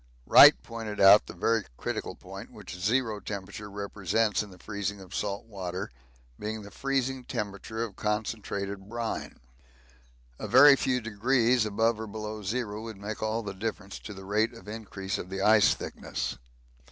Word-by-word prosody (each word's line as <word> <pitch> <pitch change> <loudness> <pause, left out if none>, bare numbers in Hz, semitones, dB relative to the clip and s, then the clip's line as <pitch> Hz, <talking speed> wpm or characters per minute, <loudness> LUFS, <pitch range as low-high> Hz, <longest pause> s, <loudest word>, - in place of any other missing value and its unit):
Wright - - +10
pointed 110 -3 -6
out 100 +2 +8
the - - -9
very 110 +4 +1
critical - - -4
point - - -10
which - - -9
zero 110 +3 0
temperature 100 0 -6
represents 100 +1 0
in 105 - -7
the 90 - -14
freezing 100 +1 -4
of 95 0 -12
salt 100 0 -3
water, 95 -4 -5 0.5
being 110 0 -4
the 100 - -11
freezing 135 -1 -1
temperature 105 +1 -4
of 110 -4 -6
concentrated 100 -2 -3
brine 115 0 -4 1.0
a - - -4
very 140 +3 +8
few 125 -2 0
degrees 115 +2 +2
above 110 +2 +1
or 110 - -5
below 105 0 -6
zero 105 +1 -3
would 110 -2 -7
make 105 +2 -6
all 110 +1 -1
the 100 -2 -5
difference 100 -1 -5
to 105 - -9
the 95 0 -10
rate 110 +4 +1
of 115 - -14
increase 105 -3 -5
of 90 - -7
the 95 0 -4
ice 105 -1 +6
thickness. - - -5
105 Hz, 165 wpm, -28 LUFS, 100-115 Hz, 1.0 s, Wright